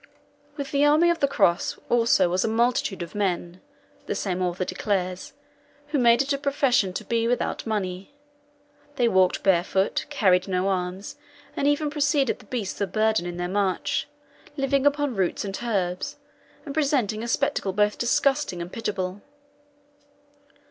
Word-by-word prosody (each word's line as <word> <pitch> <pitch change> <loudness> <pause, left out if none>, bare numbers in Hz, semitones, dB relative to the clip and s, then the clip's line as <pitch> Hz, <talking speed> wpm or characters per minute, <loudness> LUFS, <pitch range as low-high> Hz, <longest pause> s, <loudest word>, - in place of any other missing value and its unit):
"With 280 -1 -5
the 280 0 +2
army 310 +4 +5
of 335 - -2
the 280 - +3
cross 195 -10 +1
also 230 -6 +3
was 180 +2 0
a - - 0
multitude 225 -4 0
of 170 - -10
men," 180 -3 -2 0.5
the - - -2
same 185 -2 -2
author 180 0 -1
declares, 185 -1 -2 0.6
"who 295 -2 0
made 235 +1 +5
it 280 +1 -1
a 280 - -2
profession 275 -8 +2
to - - -4
be 230 -1 0
without 245 -1 -1
money. 195 -1 -3 0.8
They 245 -3 +2
walked 190 -4 +2
barefoot, 190 +1 +1
carried 190 -10 +2
no 185 0 0
arms, 185 +1 -3 0.4
and 280 - 0
even 290 +1 +1
preceded 285 -3 +1
the - - -16
beasts 210 -4 -4
of 195 -3 -1
burden 215 -3 +1
in 175 0 -5
their 175 0 -2
march, 190 -1 -1 0.5
living 275 0 +2
upon 285 -3 0
roots 190 +1 -1
and 195 -1 -5
herbs, 190 -6 -2 0.5
and 280 - -6
presenting 270 -8 0
a 235 - -4
spectacle 275 -5 0
both 210 +2 +1
disgusting 270 -4 +1
and 170 +1 -7
pitiable. 200 -3 -3
210 Hz, 155 wpm, -25 LUFS, 185-275 Hz, 0.8 s, army